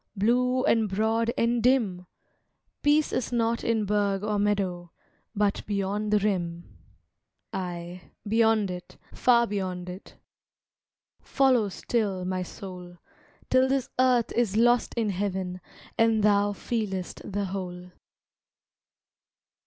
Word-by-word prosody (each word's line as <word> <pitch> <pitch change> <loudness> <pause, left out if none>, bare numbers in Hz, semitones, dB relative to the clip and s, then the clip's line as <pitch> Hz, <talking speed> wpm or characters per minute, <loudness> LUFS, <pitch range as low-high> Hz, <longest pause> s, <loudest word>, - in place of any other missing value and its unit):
Blue 250 +5 +2
and 225 -7 +2
broad 220 +4 +1
and 235 0 +1
dim! 220 -8 +1 0.7
Peace 295 +1 +3
is 255 - -1
not 230 -1 0
in 225 -2 +1
burgh 200 -1 0
or 210 -1 0
meadow, 190 -4 -1 0.4
But 205 -1 0
beyond 205 +1 -1
the 210 - +5
rim. 175 - -2 0.8
Aye, 175 -1 -6 0.2
beyond 220 -2 +3
it, 180 -1 -9 0.2
far 235 -1 +4
beyond 185 -4 -4
it; 180 +2 -10 1.1
Follow 255 -6 +2
still 195 -2 -2
my 185 0 -2
soul, 180 -1 -9 0.5
Till 260 0 +4
this 270 -1 -1
earth 250 -2 +3
is 225 -4 0
lost 240 +1 +3
in 225 -3 0
heaven, 185 -1 -3 0.4
And 225 -2 +3
thou 205 0 +3
feel'st 200 -5 -3
the 200 +1 -1
whole. 180 -2 -6
205 Hz, 115 wpm, -27 LUFS, 185-230 Hz, 1.1 s, the